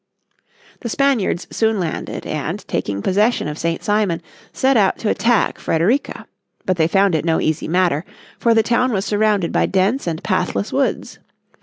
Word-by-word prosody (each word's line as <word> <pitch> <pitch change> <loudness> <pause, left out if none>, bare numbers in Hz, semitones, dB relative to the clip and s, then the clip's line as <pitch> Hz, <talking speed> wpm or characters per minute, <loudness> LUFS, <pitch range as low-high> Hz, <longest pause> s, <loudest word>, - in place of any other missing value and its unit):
The 235 - -5
Spaniards 245 -9 +1
soon 220 -2 +1
landed 170 -3 -4
and, - - -4
taking 100 0 -3
possession 210 0 +1
of 150 +1 -5
St. 165 0 -2
Simon, 205 -5 +1 0.3
set 265 +1 +2
out 200 -4 +3
to 215 - -2
attack 230 -4 +1
Frederica. 195 - 0 0.4
But 185 -1 0
they 160 -1 +3
found 195 +2 +3
it 160 - +1
no 165 -1 +1
easy 155 0 -1
matter, 175 -3 +1 0.4
for 230 -1 +3
the 225 - +4
town 245 +2 +1
was 195 0 -1
surrounded 205 -3 +1
by - - +2
dense 195 +6 0
and 165 -1 -3
pathless 180 - -1
woods. - - -1
195 Hz, 165 wpm, -19 LUFS, 165-225 Hz, 0.4 s, the